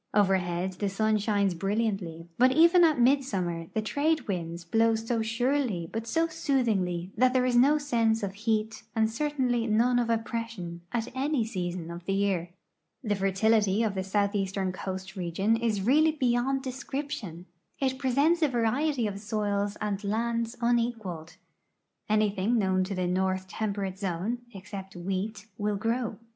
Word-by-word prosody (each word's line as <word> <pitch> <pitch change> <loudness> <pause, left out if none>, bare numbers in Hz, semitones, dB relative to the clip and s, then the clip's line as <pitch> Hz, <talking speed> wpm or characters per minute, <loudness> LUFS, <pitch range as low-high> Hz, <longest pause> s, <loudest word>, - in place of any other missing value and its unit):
Overhead 190 -3 +2
the 205 - 0
sun 215 +2 +1
shines 200 -2 +1
brilliantly, 195 -3 -2
but 255 +1 +6
even 340 +5 +6
at 310 -5 +4
midsummer 195 -11 +1
the 220 - 0
trade 295 +5 0
winds 170 -3 -4
blowso 225 +3 +1
surely 230 - 0
but 225 +1 -3
so 325 +8 +2
soothingly 215 - 0
that 255 0 +3
there 255 -1 +3
is 250 -1 +1
no 275 +5 +5
sense 230 -6 +1
of 195 -1 -2
heat 220 +1 -1
and 220 0 +2
certainly 250 -3 0
none 240 +3 +3
of 235 -1 0
oppression 225 -6 -3
at 235 +1 -3
any 270 -2 0
season 175 -5 -4
of 170 0 -8
the 195 - 0
year. 195 -4 0 0.5
The 210 -4 0
fertility 200 +2 +2
of 215 -3 0
the 190 -1 -2
southeastern 195 -1 0
coast 190 0 -6
region 190 +4 0
is 225 -4 0
really 310 +7 +4
beyond 260 -1 +1
descrii>tion. 265 - -5 0.3
It 260 -1 0
presents 280 +6 +2
a 310 - +5
variety 250 +2 +1
of 200 -1 -3
soils 205 -1 -1
and 205 -1 -2
lands 230 +2 -1
unequaled. 230 -9 -1 0.7
Anything 210 +1 +2
known 190 -3 +2
to 195 +1 -4
the 185 -1 -1
north 185 +1 0
temperate 195 -2 -3
zone, 195 +5 -2
except 195 -1 -9
wheat, 195 +4 -3
will 210 0 0
grow. 225 +1 -1
215 Hz, 150 wpm, -28 LUFS, 190-245 Hz, 0.7 s, but